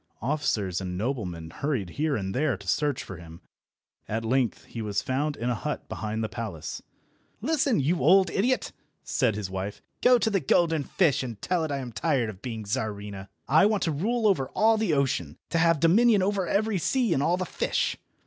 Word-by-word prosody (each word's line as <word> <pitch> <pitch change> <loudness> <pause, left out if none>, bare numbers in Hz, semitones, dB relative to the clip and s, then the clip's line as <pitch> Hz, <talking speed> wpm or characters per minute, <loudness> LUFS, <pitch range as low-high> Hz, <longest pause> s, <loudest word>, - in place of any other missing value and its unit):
Officers 110 - 0
and 90 -1 -4
noblemen 90 -8 -3
hurried 125 - -2
here 150 - 0
and 95 -4 -3
there 140 -4 +1
to 100 0 -14
search 145 - 0
for 95 - -8
him. 85 0 -12 0.7
At 115 +1 -2
length 125 0 0
he 115 - -7
was 100 -2 -1
found 145 +3 -1
in 120 - -3
a - - +2
hut 150 +6 -4
behind 110 +1 -3
the - - 0
palace. 95 -6 -6 0.6
"Listen, 275 - +1
you 160 +6 +1
old 185 +8 +5
idiot!" 250 +6 +1 0.3
said 120 -7 +1
his 100 -3 -4
wife. 95 +2 -5 0.2
"Go 250 0 +6
to 220 -1 0
the 195 - +2
golden 160 +1 +2
fish, 155 -8 +2
and 120 -5 -6
tell 180 -3 0
it - - 0
that 145 - -2
I 135 - -3
am 125 -2 -6
tired 125 -2 0
of 95 -1 -16
being 115 -4 -5
Czarina. 100 -2 -4 0.2
I 160 +8 +5
want 210 -2 0
to 165 - +1
rule 220 +10 0
over 185 -11 +3
all 225 +1 +5
the 215 -8 +1
ocean, 130 - -1
to 165 - +2
have 165 -1 +4
dominion 205 +5 +5
over 195 -2 0
every 210 -1 +1
sea 245 - +1
and 135 - +1
all 170 +5 +2
the 185 - -2
fish." - - -1
140 Hz, 205 wpm, -27 LUFS, 105-180 Hz, 0.7 s, Go